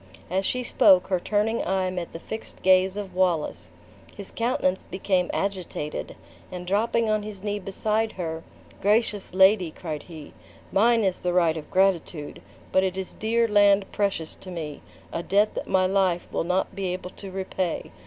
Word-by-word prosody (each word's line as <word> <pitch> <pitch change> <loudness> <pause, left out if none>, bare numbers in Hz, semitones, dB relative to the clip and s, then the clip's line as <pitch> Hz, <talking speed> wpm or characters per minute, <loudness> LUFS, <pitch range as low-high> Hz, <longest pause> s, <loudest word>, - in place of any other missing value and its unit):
As 190 +1 +1
she 250 0 -1
spoke, 190 -6 +5
her 185 -2 +2
turning 215 +4 0
eye 185 0 0
met 180 -2 -4
the - - -6
fixed 220 +5 -8
gaze 185 +1 +4
of 200 -3 -5
Wallace. 180 -4 0 0.5
His 200 -2 -8
countenance 230 -6 0
became 185 -1 -1
agitated, 185 -6 -3 0.4
and 180 -1 -6
dropping 225 +4 +1
on 215 -1 +1
his 205 -2 -8
knee 205 0 -2
beside 215 +3 -1
her; 165 -3 -4 0.4
"Gracious 210 -1 +1
lady;" 190 -2 +5
cried 155 -2 -6
he, 160 -4 -11 0.4
"mine 230 +3 +4
is 190 -2 0
the 180 -1 -1
right 170 -3 +3
of 155 -2 -7
gratitude; 180 -5 0 0.3
but 190 - +4
it 190 0 -1
is 190 -1 -4
dear 230 +1 +1
land 205 -2 +4
precious 195 -6 -1
to 190 - -12
me; 155 -5 -6 0.3
a 170 - -1
debt 205 +4 +2
that - - -5
my 190 -1 +3
life 185 -2 +1
will - - -1
not 180 +2 0
be 190 -2 -2
able 180 0 -6
to 195 - -10
repay. 185 -2 -3
190 Hz, 175 wpm, -25 LUFS, 180-205 Hz, 0.5 s, spoke